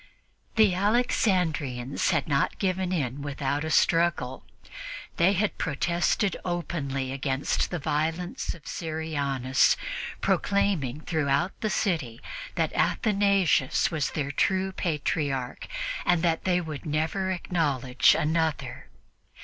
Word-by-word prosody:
The 215 Hz, -4 st, +5 dB
Alexandrians 180 Hz, -, +1 dB
had 160 Hz, -5 st, +1 dB
not 140 Hz, -1 st, +1 dB
given 185 Hz, -1 st, 0 dB
in 140 Hz, -6 st, -1 dB
without 145 Hz, 0 st, -2 dB
a 160 Hz, -, -3 dB
struggle. 165 Hz, -6 st, +2 dB, 0.7 s
They 180 Hz, +4 st, +4 dB
had 205 Hz, +2 st, 0 dB
protested 175 Hz, +5 st, +1 dB
openly 145 Hz, -7 st, -2 dB
against 135 Hz, 0 st, -1 dB
the 175 Hz, -, -2 dB
violence 160 Hz, +4 st, -2 dB
of 165 Hz, -, -17 dB
Syrianus, 145 Hz, -5 st, +1 dB, 0.4 s
proclaiming 170 Hz, -9 st, +1 dB
throughout 155 Hz, +2 st, +1 dB
the 215 Hz, -, 0 dB
city 155 Hz, -, -1 dB, 0.4 s
that -, -, 0 dB
Athanasius 200 Hz, -, +2 dB
was 155 Hz, -4 st, 0 dB
their 140 Hz, -2 st, -2 dB
true 190 Hz, +5 st, +1 dB
Patriarch 145 Hz, -7 st, -2 dB, 0.4 s
and 175 Hz, -1 st, +2 dB
that 165 Hz, -2 st, +1 dB
they 180 Hz, -1 st, +3 dB
would 155 Hz, -4 st, -6 dB
never 160 Hz, +5 st, -1 dB
acknowledge 145 Hz, -9 st, +2 dB
another. 155 Hz, -4 st, -1 dB
160 Hz, 110 wpm, -27 LUFS, 140-180 Hz, 0.7 s, The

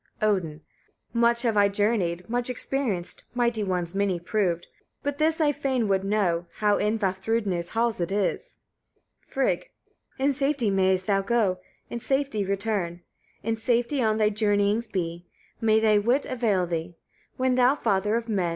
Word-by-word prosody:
Odin. 185 Hz, -8 st, 0 dB, 0.5 s
3. 235 Hz, -, -1 dB
Much 235 Hz, 0 st, +4 dB
have 230 Hz, -3 st, +1 dB
I 205 Hz, -1 st, +5 dB
journeyed, 200 Hz, -4 st, 0 dB
much 245 Hz, +2 st, -1 dB
experienced, 245 Hz, -7 st, -2 dB
mighty 235 Hz, -3 st, +1 dB
ones 180 Hz, -3 st, -1 dB
many 195 Hz, -3 st, 0 dB
proved; 175 Hz, -2 st, -1 dB, 0.4 s
but 285 Hz, 0 st, -3 dB
this 315 Hz, +1 st, +2 dB
I 300 Hz, -2 st, +4 dB
fain 265 Hz, -5 st, -1 dB
would 195 Hz, -1 st, +1 dB
know, 185 Hz, -4 st, 0 dB
how 210 Hz, -1 st, +2 dB
in 210 Hz, +2 st, +1 dB
Vafthrûdnir's 190 Hz, -2 st, -1 dB
halls 230 Hz, -1 st, 0 dB
it 170 Hz, +1 st, -2 dB
is. 205 Hz, -, -2 dB, 0.7 s
Frigg. 270 Hz, -, -1 dB, 0.5 s
4. 265 Hz, -, -1 dB
In 280 Hz, -, +3 dB
safety 275 Hz, -5 st, +1 dB
mayest 190 Hz, -1 st, +2 dB
thou 195 Hz, -1 st, +2 dB
go, 200 Hz, -3 st, +1 dB, 0.3 s
in 235 Hz, -, -3 dB
safety 270 Hz, -4 st, 0 dB
return; 195 Hz, -3 st, -2 dB, 0.4 s
in 225 Hz, -, 0 dB
safety 240 Hz, +4 st, 0 dB
on 220 Hz, -2 st, +2 dB
thy 215 Hz, -1 st, +3 dB
journeyings 205 Hz, +1 st, +1 dB
be; 170 Hz, -2 st, -4 dB, 0.3 s
may 220 Hz, -1 st, +4 dB
thy 215 Hz, -1 st, +4 dB
wit 245 Hz, +7 st, +2 dB
avail 220 Hz, -8 st, +1 dB
thee, 170 Hz, 0 st, -4 dB, 0.4 s
when 255 Hz, 0 st, +2 dB
thou, 250 Hz, +2 st, +4 dB
father 210 Hz, -4 st, +1 dB
of 230 Hz, 0 st, -2 dB
men! 190 Hz, -6 st, 0 dB
210 Hz, 160 wpm, -26 LUFS, 190-235 Hz, 0.7 s, I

